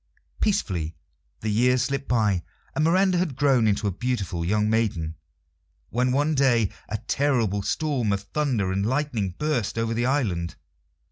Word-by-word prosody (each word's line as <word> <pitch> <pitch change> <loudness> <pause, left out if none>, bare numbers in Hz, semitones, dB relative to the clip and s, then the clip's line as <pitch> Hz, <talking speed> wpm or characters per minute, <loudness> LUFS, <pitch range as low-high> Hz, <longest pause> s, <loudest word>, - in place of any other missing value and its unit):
Peacefully 90 - 0 0.5
the 110 - -2
years 125 +3 +3
slipped 140 +1 -2
by, 105 -7 +2 0.3
and 155 - 0
Miranda 185 +2 +3
had 170 -7 -1
grown 130 -5 +3
into 105 0 +1
a 100 - +1
beautiful 100 -5 -2
young 105 +4 +1
maiden, 105 -8 0 0.8
when 125 +2 +1
one 145 +4 +2
day 125 -7 +3 0.2
a 110 - -1
terrible 120 -8 +1
storm 135 -3 0
of 100 0 0
thunder 125 -11 0
and 95 +1 0
lightning 115 -6 -1
burst 145 -9 -1
over 115 0 0
the 120 +2 0
island. 100 -12 0
115 Hz, 150 wpm, -25 LUFS, 100-140 Hz, 0.8 s, years